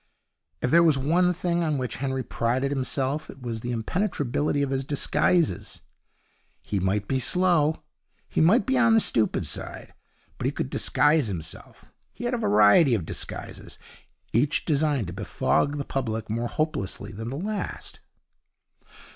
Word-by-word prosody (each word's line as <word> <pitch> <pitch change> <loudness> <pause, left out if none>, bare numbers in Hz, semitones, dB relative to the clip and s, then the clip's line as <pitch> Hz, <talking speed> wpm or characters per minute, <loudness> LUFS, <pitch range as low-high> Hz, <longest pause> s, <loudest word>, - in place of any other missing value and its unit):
If 125 - +1
there 170 +2 +7
was 160 -4 +4
one 170 +7 +2
thing 175 -1 -1
on 155 -3 0
which 125 -4 -3
Henry 130 0 -2
prided 130 +5 -1
himself 135 +2 -2
it - - -11
was 115 -3 -5
the 120 - -4
impenetrability 145 - -1
of 140 - -2
his 135 0 -1
disguises. 140 - 0 0.8
He 100 - -3
might 100 +2 0
be 130 - 0
slow; 165 +1 +2 0.4
he - - 0
might 185 +10 +4
be 265 -1 +1
on 230 -2 +5
the - - +6
stupid 115 - +1
side; - - -6 0.5
but - - -3
he - - +2
could - - -4
disguise 150 -3 +3
himself. 85 -5 -8 0.2
He - - -9
had 240 +1 -1
a 245 - 0
variety 105 - +5
of 95 -7 -3
disguises, - - -6 0.6
each 140 +7 +1
designed 145 - +1
to 85 - -6
befog 145 +8 0
the 140 - -3
public 110 -5 -3
more 115 +2 -1
hopelessly 110 -9 -3
than 110 +2 -6
the 135 - -4
last. 205 +5 -5
135 Hz, 155 wpm, -25 LUFS, 115-160 Hz, 0.8 s, there